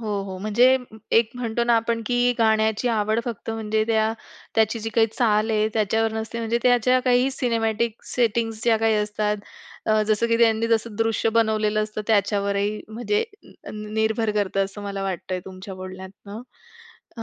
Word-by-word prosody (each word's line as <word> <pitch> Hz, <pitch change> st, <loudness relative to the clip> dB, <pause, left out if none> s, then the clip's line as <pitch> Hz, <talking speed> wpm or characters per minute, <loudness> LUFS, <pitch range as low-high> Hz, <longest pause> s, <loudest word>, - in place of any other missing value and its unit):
हो, 225 Hz, -, -6 dB, 0.2 s
हो. 190 Hz, -1 st, -6 dB
म्हणजे 235 Hz, +6 st, +4 dB, 0.4 s
एक 230 Hz, -1 st, +1 dB
म्हणतो 235 Hz, -1 st, -1 dB
ना 235 Hz, 0 st, +3 dB
आपण, 230 Hz, 0 st, 0 dB
की 245 Hz, +1 st, +2 dB
गाण्याची 220 Hz, +1 st, +2 dB
आवड 220 Hz, 0 st, +1 dB
फक्त 230 Hz, -2 st, -5 dB
म्हणजे 220 Hz, -1 st, -1 dB
त्या 220 Hz, -1 st, +2 dB, 0.4 s
त्याची 220 Hz, +1 st, +2 dB
जी 225 Hz, -, -4 dB
काही 225 Hz, -1 st, +5 dB
चाल 220 Hz, -2 st, +2 dB
आहे, 215 Hz, 0 st, +2 dB
त्याच्यावर 220 Hz, +1 st, +1 dB
नसते 220 Hz, +1 st, -4 dB
म्हणजे 230 Hz, +1 st, 0 dB
त्याच्या 250 Hz, 0 st, +4 dB
काही 250 Hz, +1 st, +3 dB
सिनेमॅटिक 230 Hz, -3 st, -1 dB
सेटिंग्ज 225 Hz, -2 st, 0 dB
ज्या 230 Hz, -2 st, +4 dB
काही 225 Hz, -1 st, +2 dB
असतात 210 Hz, 0 st, 0 dB, 0.5 s
अ, 215 Hz, 0 st, +3 dB
जसं 215 Hz, +2 st, +2 dB
की 230 Hz, 0 st, +2 dB
त्यांनी 225 Hz, -1 st, +3 dB
जसं 225 Hz, -1 st, 0 dB
दृश्य 225 Hz, 0 st, +1 dB
बनवलेलं 215 Hz, -1 st, +2 dB
असतं 215 Hz, 0 st, -5 dB
त्याच्यावरही 200 Hz, -1 st, +1 dB
म्हणजे 245 Hz, -, -1 dB, 0.5 s
निर्भर 220 Hz, +1 st, -1 dB
करतं 195 Hz, -1 st, +1 dB
असं 195 Hz, +1 st, -9 dB
मला 200 Hz, -1 st, -4 dB
वाटतंय 185 Hz, -1 st, -3 dB
तुमच्या 190 Hz, +1 st, -9 dB
बोलण्यातनं. 190 Hz, +3 st, -9 dB, 0.8 s
अ, 225 Hz, -, -5 dB
220 Hz, 160 wpm, -23 LUFS, 210-230 Hz, 0.8 s, काही